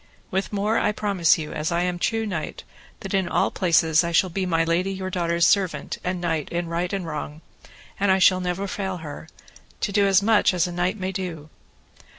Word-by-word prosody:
With 190 Hz, +1 st, -1 dB
more 210 Hz, +2 st, +1 dB
I 210 Hz, -, +1 dB
promise 200 Hz, -6 st, +2 dB
you 155 Hz, -2 st, -6 dB
as 155 Hz, +1 st, -2 dB
I 170 Hz, +1 st, +1 dB
am 180 Hz, -1 st, -2 dB
true 225 Hz, +4 st, 0 dB
knight, 180 Hz, -7 st, -5 dB, 0.4 s
that -, -, -6 dB
in 190 Hz, -2 st, +1 dB
all -, -, +1 dB
places 165 Hz, -2 st, +3 dB
I 170 Hz, -, -2 dB
shall 180 Hz, +2 st, +2 dB
be 185 Hz, +1 st, -2 dB
my 165 Hz, -2 st, +2 dB
lady 170 Hz, +4 st, 0 dB
your 190 Hz, -1 st, -5 dB
daughter's 170 Hz, -1 st, +1 dB
servant 180 Hz, -7 st, +1 dB
and 180 Hz, 0 st, -2 dB
knight 160 Hz, -3 st, -2 dB
in 175 Hz, 0 st, -2 dB
right 170 Hz, +2 st, -2 dB
and 195 Hz, -2 st, -2 dB
in -, -, -7 dB
wrong, 150 Hz, 0 st, -6 dB, 0.6 s
and 200 Hz, 0 st, +2 dB
I 190 Hz, -, +4 dB
shall 185 Hz, -1 st, +5 dB
never 180 Hz, +2 st, -2 dB
fail 190 Hz, -1 st, -3 dB
her, 150 Hz, +2 st, -8 dB, 0.5 s
to 205 Hz, -, -1 dB
do 200 Hz, 0 st, +3 dB
as 195 Hz, 0 st, +4 dB
much 205 Hz, -3 st, +3 dB
as 175 Hz, -, +2 dB
a 180 Hz, -, -4 dB
knight 175 Hz, +4 st, -1 dB
may 190 Hz, -1 st, -3 dB
do. 170 Hz, -5 st, -6 dB
180 Hz, 215 wpm, -24 LUFS, 170-195 Hz, 0.6 s, shall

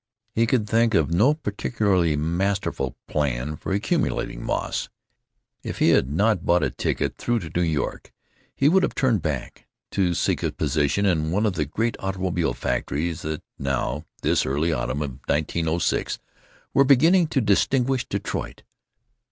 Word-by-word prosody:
He 115 Hz, +1 st, +2 dB
could 115 Hz, -3 st, +1 dB
think 115 Hz, 0 st, +3 dB
of 85 Hz, -, +2 dB
no 120 Hz, -, +4 dB
particularly 100 Hz, -, 0 dB
masterful 85 Hz, +7 st, -1 dB
plan 70 Hz, 0 st, -1 dB
for 85 Hz, -, -6 dB
accumulating 100 Hz, -, -1 dB
moss. -, -, -2 dB, 0.7 s
If -, -, -5 dB
he -, -, +4 dB
had 65 Hz, -, +3 dB
not 100 Hz, +5 st, +1 dB
bought 85 Hz, 0 st, +3 dB
a -, -, 0 dB
ticket -, -, -2 dB
through 120 Hz, 0 st, +1 dB
to 80 Hz, -, -7 dB
New 90 Hz, -1 st, +2 dB
York 75 Hz, -3 st, -3 dB, 0.4 s
he 135 Hz, -, +3 dB
would 190 Hz, +5 st, +5 dB
have -, -, -1 dB
turned 120 Hz, -8 st, +2 dB
back, 75 Hz, -5 st, -4 dB, 0.2 s
to 90 Hz, -3 st, +1 dB
seek -, -, 0 dB
a -, -, 0 dB
position 75 Hz, +7 st, 0 dB
in 80 Hz, -5 st, +1 dB
one 100 Hz, +6 st, +1 dB
of 105 Hz, -, +1 dB
the 75 Hz, -4 st, -1 dB
great 110 Hz, +10 st, -1 dB
automobile 95 Hz, -7 st, -1 dB
factories 80 Hz, +6 st, -2 dB
that 75 Hz, 0 st, -4 dB, 0.2 s
now, 70 Hz, +1 st, -1 dB, 0.2 s
this -, -, +2 dB
early 75 Hz, +5 st, 0 dB
autumn 65 Hz, +3 st, -2 dB
of 65 Hz, -3 st, -6 dB
1906, 80 Hz, +3 st, 0 dB, 0.6 s
were 140 Hz, -, +6 dB
beginning 160 Hz, +6 st, +5 dB
to 150 Hz, -, 0 dB
distinguish 125 Hz, +4 st, +2 dB
Detroit. -, -, -4 dB
90 Hz, 155 wpm, -24 LUFS, 75-115 Hz, 0.7 s, were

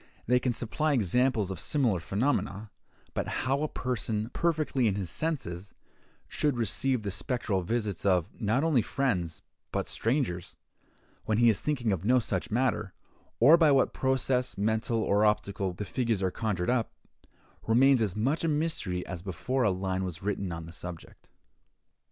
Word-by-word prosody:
They 125 Hz, +2 st, +3 dB
can 125 Hz, -, 0 dB
supply 145 Hz, +6 st, -1 dB
examples 115 Hz, -2 st, +1 dB
of 95 Hz, -, -5 dB
similar 120 Hz, -, +1 dB
phenomena; 105 Hz, -, -1 dB, 0.4 s
but -, -, -2 dB, 0.2 s
how 135 Hz, +2 st, +1 dB
a 155 Hz, -, +1 dB
person, 110 Hz, -4 st, -3 dB
perfectly 155 Hz, -7 st, +1 dB
in 100 Hz, -, +1 dB
his 95 Hz, -4 st, -3 dB
senses, 100 Hz, -, -3 dB, 0.5 s
should 145 Hz, -4 st, 0 dB
receive 120 Hz, +2 st, 0 dB
the 100 Hz, -, -2 dB
spectral 105 Hz, -2 st, -1 dB
visits 105 Hz, +1 st, -2 dB
of, 95 Hz, -2 st, +2 dB
not 110 Hz, +6 st, +1 dB
only 155 Hz, -7 st, +3 dB
friends, 95 Hz, -, -2 dB, 0.3 s
but -, -, -2 dB
strangers, 110 Hz, -, -1 dB, 0.7 s
when 110 Hz, -1 st, +1 dB
he 120 Hz, 0 st, +6 dB
is 110 Hz, -, +1 dB
thinking 125 Hz, -7 st, 0 dB
of 95 Hz, -3 st, -1 dB
no 125 Hz, +5 st, +4 dB
such 100 Hz, -6 st, -1 dB
matter—or 125 Hz, -, +1 dB
by 160 Hz, -3 st, +5 dB
what 135 Hz, -1 st, +3 dB
process, 130 Hz, -1 st, 0 dB
mental 110 Hz, +2 st, 0 dB
or 100 Hz, +1 st, +2 dB
optical, 100 Hz, -3 st, +1 dB
the 95 Hz, +4 st, -6 dB
figures 115 Hz, -4 st, -1 dB
are 95 Hz, -, +1 dB
conjured 105 Hz, -2 st, -1 dB
up—remains 125 Hz, +1 st, 0 dB
as 105 Hz, -5 st, 0 dB
much 135 Hz, +10 st, 0 dB
a -, -, +1 dB
mystery 150 Hz, -, -1 dB
as 90 Hz, -2 st, -6 dB
before 100 Hz, +9 st, -2 dB
a 110 Hz, -, +4 dB
line 95 Hz, 0 st, -1 dB
was 90 Hz, -1 st, -6 dB
written 100 Hz, -2 st, -2 dB
on 80 Hz, -1 st, -5 dB
the 80 Hz, -, -10 dB
subject. 85 Hz, -1 st, -9 dB
110 Hz, 155 wpm, -29 LUFS, 95-130 Hz, 0.7 s, he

